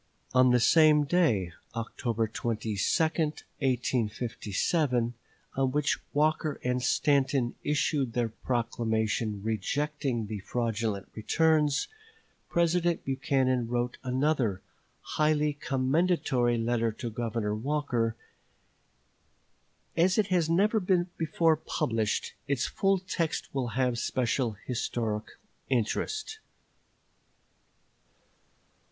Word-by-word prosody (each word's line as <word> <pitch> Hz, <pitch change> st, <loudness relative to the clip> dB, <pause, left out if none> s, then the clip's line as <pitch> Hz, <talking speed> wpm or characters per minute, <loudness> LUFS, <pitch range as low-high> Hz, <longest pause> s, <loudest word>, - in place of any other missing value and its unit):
On 130 Hz, 0 st, +6 dB
the 125 Hz, 0 st, +4 dB
same 150 Hz, +4 st, +6 dB
day 135 Hz, -, +2 dB, 0.2 s
(October 115 Hz, 0 st, -2 dB
22, 110 Hz, 0 st, -3 dB
1857) 125 Hz, -, 0 dB, 0.4 s
on 135 Hz, -1 st, +1 dB
which 150 Hz, +1 st, +1 dB
Walker 155 Hz, 0 st, +1 dB
and 125 Hz, 0 st, 0 dB
Stanton 135 Hz, -2 st, +2 dB
issued 145 Hz, -4 st, 0 dB
their 120 Hz, -2 st, 0 dB
proclamation 110 Hz, -3 st, -1 dB
rejecting 130 Hz, +3 st, -1 dB
the 105 Hz, 0 st, -5 dB
fraudulent 110 Hz, -2 st, -2 dB
returns, 150 Hz, +5 st, +2 dB, 0.6 s
President 170 Hz, 0 st, +1 dB
Buchanan 130 Hz, -2 st, +1 dB
wrote 120 Hz, +1 st, -1 dB
another 130 Hz, -6 st, 0 dB, 0.4 s
highly 150 Hz, -1 st, +1 dB
commendatory 135 Hz, -3 st, +1 dB
letter 115 Hz, 0 st, +1 dB
to 115 Hz, +1 st, -5 dB
Governor 110 Hz, -2 st, -2 dB
Walker. 120 Hz, -2 st, -1 dB, 1.8 s
As 180 Hz, +3 st, +3 dB
it 210 Hz, -2 st, +2 dB
has 175 Hz, -4 st, +2 dB
never 205 Hz, +6 st, +3 dB
before 175 Hz, -3 st, +1 dB
been 160 Hz, -, -30 dB
published, 110 Hz, -2 st, -1 dB
its 140 Hz, -3 st, 0 dB
full 195 Hz, 0 st, +1 dB
text 175 Hz, -3 st, -3 dB
will 135 Hz, -3 st, -1 dB
have 125 Hz, -2 st, +1 dB
special 125 Hz, -2 st, 0 dB
historical 115 Hz, -3 st, -3 dB, 0.3 s
interest. 430 Hz, -, -1 dB
130 Hz, 90 wpm, -29 LUFS, 115-155 Hz, 1.8 s, On